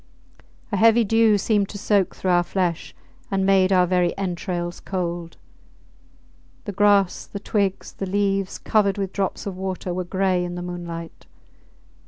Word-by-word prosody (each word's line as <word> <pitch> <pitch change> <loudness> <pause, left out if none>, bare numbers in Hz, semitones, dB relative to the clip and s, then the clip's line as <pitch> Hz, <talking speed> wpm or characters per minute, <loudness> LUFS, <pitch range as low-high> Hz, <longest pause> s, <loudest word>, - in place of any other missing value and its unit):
A 205 - 0
heavy 230 +3 +5
dew 225 0 +4
seemed 205 0 +1
to 205 - -7
soak 200 -2 +1
through 185 - -1
our 175 0 +4
flesh 175 -2 -2 0.3
and 195 -1 0
made 190 -1 +4
our 180 -1 +5
very 180 -1 +1
entrails 175 -2 -3
cold. 175 -3 -4 1.3
The 205 - -3
grass, 200 -1 +2
the 200 - -7
twigs, 200 -2 -1
the 195 - -5
leaves, 195 0 0
covered 210 -2 +1
with 195 -1 -3
drops 195 -2 -2
of 195 -2 -4
water, 185 -1 -4
were 185 +1 -2
gray 185 0 0
in 175 0 -4
the 175 - -5
moonlight. 170 -2 -7
190 Hz, 155 wpm, -23 LUFS, 180-200 Hz, 1.3 s, heavy